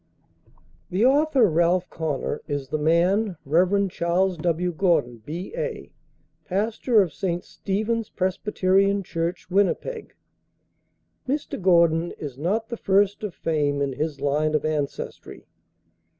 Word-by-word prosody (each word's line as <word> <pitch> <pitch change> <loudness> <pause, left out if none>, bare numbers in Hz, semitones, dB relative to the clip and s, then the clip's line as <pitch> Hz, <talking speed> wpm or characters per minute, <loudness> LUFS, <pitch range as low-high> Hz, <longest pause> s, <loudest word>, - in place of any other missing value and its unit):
The 195 +6 +2
author, 280 -3 +4
"Ralph 175 +2 +2
Connor," 150 -2 -3
is 145 -3 -3
the 155 - -1
man, 175 +5 +2
Rev. 185 +7 +3
Charles 175 +3 +1
W. 175 +2 0
Gordon, 155 - +1
B.A., 450 - -5 0.5
pastor 215 +3 +2
of 170 -6 -6
St. 175 +1 -2
Stephen's 215 +3 -2
Presbyterian 195 +1 +1
Church, 170 +1 -4
Winnipeg. 205 - 0 1.1
Mr. 285 -6 -2
Gordon 170 -2 +3
is 145 -5 -7
not 205 - -1
the 235 - -4
first 200 0 +2
of 205 -7 -5
fame 145 -2 0
in 140 -1 -1
his 150 +1 -3
line 150 +2 +1
of 155 - 0
ancestry. 150 -2 -4
180 Hz, 120 wpm, -24 LUFS, 155-200 Hz, 1.1 s, author